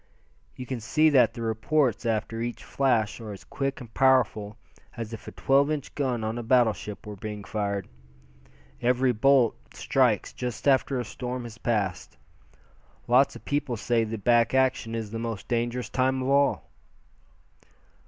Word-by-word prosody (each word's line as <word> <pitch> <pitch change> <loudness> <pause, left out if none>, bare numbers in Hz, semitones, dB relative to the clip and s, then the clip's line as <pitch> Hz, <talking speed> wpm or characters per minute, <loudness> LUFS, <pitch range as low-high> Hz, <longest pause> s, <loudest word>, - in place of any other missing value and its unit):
"You 125 - -7
can 130 -1 -4
see 155 +8 +3
that 120 -5 +4
the 115 - -5
reports 115 +2 0
after 115 0 -1
each 120 +1 -4
flash 120 -5 0
are 110 -2 -7
as 100 - -11
quick 135 -1 -3
and 120 -4 -11
powerful 115 -6 +2 0.4
as 115 -1 -5
if 110 - -9
a - - -6
twelve 140 +2 +2
inch 150 -3 -3
gun 125 -5 -1
on 110 +2 -2
a - - -3
battleship 115 -3 +1
were 105 -1 -7
being 105 +1 -6
fired. 100 -2 -3 0.9
Every 125 +1 +3
bolt 125 +1 +4 0.2
strikes - - +1
just 125 0 -4
after 135 -1 +3
a 120 - -3
storm 125 +3 -5
has 115 -1 -10
passed. 100 -6 -2 0.9
Lots 125 +3 +4
of - - -12
people 145 -4 -1
say 115 +1 +1
the 110 0 -4
back 120 +4 +3
action 130 -3 +1
is 110 -2 -4
the 115 - -4
most 115 -4 -5
dangerous 120 0 -1
time 130 0 +1
of 130 - -2
all." 140 0 +2
120 Hz, 165 wpm, -26 LUFS, 110-130 Hz, 0.9 s, that